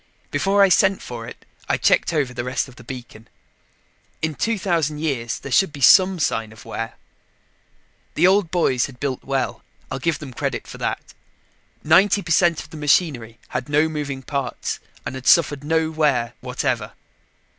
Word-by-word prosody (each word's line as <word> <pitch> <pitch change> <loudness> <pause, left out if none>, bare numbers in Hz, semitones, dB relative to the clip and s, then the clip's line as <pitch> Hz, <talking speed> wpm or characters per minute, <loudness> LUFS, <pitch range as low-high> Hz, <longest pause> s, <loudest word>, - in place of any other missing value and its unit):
Before 195 +7 +3
I 195 - +5
sent 190 +2 +4
for 115 -2 -7
it, - - -12 0.2
I - - +2
checked - - +3
over 145 -6 0
the 120 - -4
rest 125 +3 -2
of 130 - -15
the 125 - -14
beacon. 120 -3 -10 1.0
In 160 0 0
2000 170 -7 0
years, 135 -7 -2
there 140 - -9
should 190 +5 +3
be 145 - -10
some 185 +8 +6
sign 115 -8 -1
of 110 - -14
wear. 115 0 -5 1.2
The 170 - +4
old 190 -1 +4
boys 145 -8 +1
had 125 -2 -14
built 135 -3 -3
well, 135 -1 -2 0.3
I'll 135 - -3
give 160 +3 0
them 140 -4 -9
credit - - -3
for - - -10
that. - - -4 0.7
Ninety 195 +6 +4
per 170 - -5
cent 170 -1 +3
of 155 - -14
the 160 - -8
machinery 140 -6 +1
had 125 - -4
no 150 +2 +3
moving 145 -4 -4
parts 135 -3 -3 0.3
and - - -4
had 130 -1 -7
suffered 145 -4 +4
no 160 +1 +1
wear 140 -7 +1
whatever. - - -2
145 Hz, 175 wpm, -22 LUFS, 125-165 Hz, 1.2 s, some